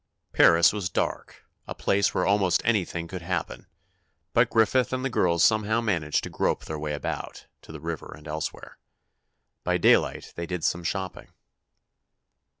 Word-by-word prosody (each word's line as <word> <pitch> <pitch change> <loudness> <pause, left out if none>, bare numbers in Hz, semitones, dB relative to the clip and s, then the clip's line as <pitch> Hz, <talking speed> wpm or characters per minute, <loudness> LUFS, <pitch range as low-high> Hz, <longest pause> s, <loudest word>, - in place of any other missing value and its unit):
Paris 85 +2 +6
was 100 -4 -3
dark—a - - -5
place 100 0 +1
where - - 0
almost 95 -4 +2
anything 90 -7 0
could 90 +1 -7
happen—but 85 -1 -4
Griffith 115 +3 +2
and 130 0 -2
the 135 - -1
girls 85 -5 +2
somehow 110 0 +3
managed 85 -10 0
to - - -5
grope - - -1
their 80 -1 -5
way 75 0 -3
about, 70 - -5 0.2
to - - -13
the 80 - -8
river 80 +1 -6
and 75 0 -14
elsewhere. 80 0 -6 0.8
By - - +1
daylight - - +2
they 85 0 -5
did 90 -2 -4
some 85 - 0
shopping. 95 +2 -4
90 Hz, 150 wpm, -26 LUFS, 80-105 Hz, 0.8 s, Paris